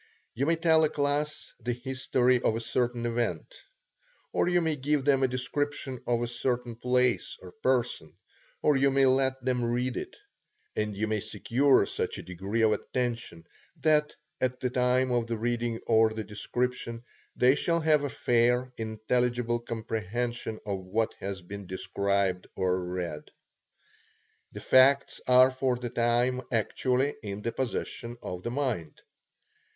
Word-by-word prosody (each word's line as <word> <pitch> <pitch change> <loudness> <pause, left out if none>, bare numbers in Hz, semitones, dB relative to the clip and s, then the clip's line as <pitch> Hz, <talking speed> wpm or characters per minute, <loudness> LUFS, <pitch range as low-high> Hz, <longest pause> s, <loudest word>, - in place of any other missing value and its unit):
You 135 +5 -1
may 165 - +4
tell 160 -1 +4
a 155 - +3
class 145 +1 -1
the 120 +1 -2
history 125 0 +1
of 110 - +1
a - - -1
certain 120 0 -1
event; 120 - -2 0.8
or - - +2
you 175 0 +3
may 160 -2 0
give 145 0 0
them 140 -2 +4
a 130 - +4
description 130 +1 -3
of 120 -1 +1
a - - -1
certain 120 0 -2
place 125 0 +1
or 90 - -11
person; 120 - 0 0.5
or 150 - +4
you 135 +1 +4
may 135 0 +3
let 130 0 +2
them 125 -2 +1
read 120 +2 -1
it; - - -6 0.6
and 105 -2 -2
you 110 - 0
may 110 0 -1
secure 130 +4 +2
such - - -3
a - - -7
degree 95 +6 -2
of 110 - +5
attention, 120 -9 -3 0.3
that, 150 -1 +2 0.3
at 125 0 0
the 125 - -1
time 125 +1 +2
of 120 -2 +1
the 115 -1 -2
reading 120 0 -1
or 110 -1 +5
the 110 0 -4
description, 115 +2 -3 0.3
they 125 +1 +5
shall 170 +3 +1
have 155 -2 +3
a 145 - -1
fair, 125 +1 +1
intelligible 120 +2 0
comprehension 115 0 -3
of 100 -2 -2
what 110 +5 -1
has 95 -1 -5
been 100 +1 -8
described 100 0 -1
or 95 -1 0
read. 90 -4 -5 1.2
The - - -8
facts 135 +2 +4
are 130 +1 +7
for 130 -1 0
the 120 -1 -5
time 120 +2 +1
actually 125 +5 +1
in 105 -1 -6
the 115 - -1
possession 120 -1 -4
of 90 0 -5
the 120 - -3
mind. 120 - -2
120 Hz, 155 wpm, -28 LUFS, 110-130 Hz, 1.2 s, are